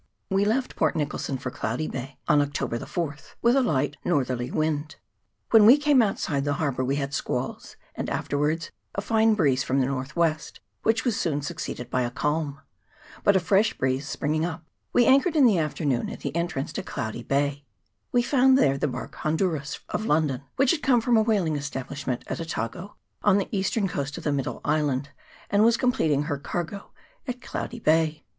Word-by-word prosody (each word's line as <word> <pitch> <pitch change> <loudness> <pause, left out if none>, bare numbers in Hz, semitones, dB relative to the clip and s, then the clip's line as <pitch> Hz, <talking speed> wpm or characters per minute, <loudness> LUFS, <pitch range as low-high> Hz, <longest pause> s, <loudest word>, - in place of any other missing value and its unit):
We 195 +1 +3
left 250 +5 0
Port - - +1
Nicholson 145 -3 -2
for 125 -1 -5
Cloudy 125 +8 -2
Bay 135 +1 -6
on 145 -1 +5
Octo 145 0 -2
ber 115 - -3
the - - -8
4th, 155 -4 -5
with 235 +2 +5
a 270 - +4
light 145 - 0
northerly 130 -6 0
wind. 155 0 -1 0.6
When 225 -2 +8
we 255 +5 +9
came 290 -3 +4
outside 160 -9 0
the 145 0 0
harbour 135 -4 -1
we 135 +2 0
had 140 -1 -3
squalls, - - -3 0.2
and - - -4
afterwards 150 +3 -1 0.2
a 200 - -1
fine 220 +1 +3
breeze 140 -9 +2
from 135 +1 0
the 130 - +3
north 135 +1 -4
west, 165 -2 0 0.2
which 225 +2 +1
was 240 -4 +1
soon 145 -4 -1
succeeded 145 -6 -5
by 130 - +1
a 120 - 0
calm; 145 +2 -2 0.6
but 200 - +5
a - - +5
fresh 195 +5 +2
breeze 130 +2 0
springing 155 +2 -1
up, 165 -1 -4 0.3
we 245 - +4
anchored 275 +6 +4
in 290 -4 +6
the 210 -7 +4
afternoon 150 -5 -1
at - - -8
the - - -4
entrance 170 -4 -2
to - - -3
Cloudy 110 - -5
Bay, 140 +2 0 0.5
We 245 -1 +3
found 265 0 +4
there 140 - +3
the - - +1
barque 130 - -6
Honduras, 155 -3 -1
of 215 - -2
London, 150 -4 +1
which 270 -1 +4
had 330 - 0
come 250 -4 +3
from 240 +1 +2
a 220 - +5
whaling 200 -8 +1
establishment 140 -2 -4
at - - -4
Otago, 165 - -5 0.3
on 205 -1 +4
the 200 - -1
eastern 200 +1 0
coast 145 -4 -3
of - - -7
the 150 - 0
middle 140 -2 -3
island, 145 -3 0 0.4
and 205 +1 +4
was 230 +1 +5
completing 160 - +2
her 145 -2 -3
cargo 175 +6 -5 0.4
at 250 -1 -4
Cloudy 240 -1 -5
Bay. 155 -4 +2
155 Hz, 195 wpm, -26 LUFS, 140-205 Hz, 0.6 s, we